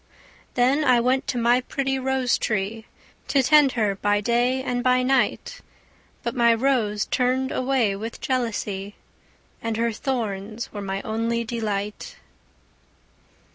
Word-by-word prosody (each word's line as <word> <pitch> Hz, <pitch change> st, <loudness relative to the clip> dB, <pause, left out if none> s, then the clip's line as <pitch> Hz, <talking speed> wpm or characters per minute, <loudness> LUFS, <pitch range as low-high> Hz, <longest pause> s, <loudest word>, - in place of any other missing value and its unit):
Then 260 Hz, +5 st, +3 dB
I 250 Hz, -4 st, +4 dB
went 255 Hz, +3 st, +1 dB
to 250 Hz, -, -1 dB
my 240 Hz, +1 st, +3 dB
pretty 270 Hz, 0 st, -2 dB
rose 260 Hz, -1 st, +1 dB
tree, 215 Hz, +2 st, -2 dB, 0.4 s
To 275 Hz, -2 st, +2 dB
tend 295 Hz, 0 st, +5 dB
her 215 Hz, -4 st, +1 dB
by 205 Hz, +1 st, +1 dB
day 240 Hz, +4 st, +1 dB
and 245 Hz, -2 st, -2 dB
by 255 Hz, 0 st, +3 dB
night; 265 Hz, +1 st, 0 dB, 0.6 s
But 235 Hz, -, -2 dB
my 235 Hz, -2 st, +4 dB
rose 225 Hz, -5 st, +1 dB
turned 255 Hz, +1 st, 0 dB
away 255 Hz, -6 st, +1 dB
with 225 Hz, +3 st, -6 dB
jealousy, 210 Hz, -6 st, -2 dB, 0.7 s
And 225 Hz, -1 st, -2 dB
her 230 Hz, 0 st, +1 dB
thorns 220 Hz, -3 st, -4 dB
were 205 Hz, -, -5 dB
my 195 Hz, 0 st, -4 dB
only 230 Hz, +1 st, -1 dB
delight. 210 Hz, -3 st, -4 dB
235 Hz, 135 wpm, -24 LUFS, 215-255 Hz, 0.7 s, tend